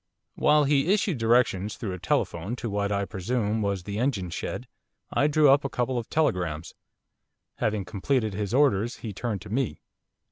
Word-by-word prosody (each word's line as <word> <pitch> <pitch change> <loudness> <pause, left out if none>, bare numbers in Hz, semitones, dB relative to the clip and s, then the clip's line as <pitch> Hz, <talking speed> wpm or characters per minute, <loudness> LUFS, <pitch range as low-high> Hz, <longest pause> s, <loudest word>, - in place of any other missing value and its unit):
While 150 0 +4
he 145 +4 +2
issued 195 - +1
directions 115 -4 +2
through 100 -5 -4
a 90 - -6
telephone 105 +5 -1
to 115 -3 -5
what, 100 0 -1
I 100 0 0
presume, 110 +3 -1
was 100 -3 -1
the 100 +2 -4
engine 110 -9 -1
shed, - - -4 0.5
I 145 - +3
drew 150 0 +4
up 140 +1 +4
a 135 - -2
couple 125 0 -1
of 115 - -8
telegrams. 85 - 0 0.8
Having 105 -3 -1
completed 110 +2 -1
his 100 0 -3
orders 120 -5 +3
he 105 - -4
turned 105 -1 -3
to 105 - -10
me. 130 0 -1
110 Hz, 175 wpm, -26 LUFS, 100-135 Hz, 0.8 s, While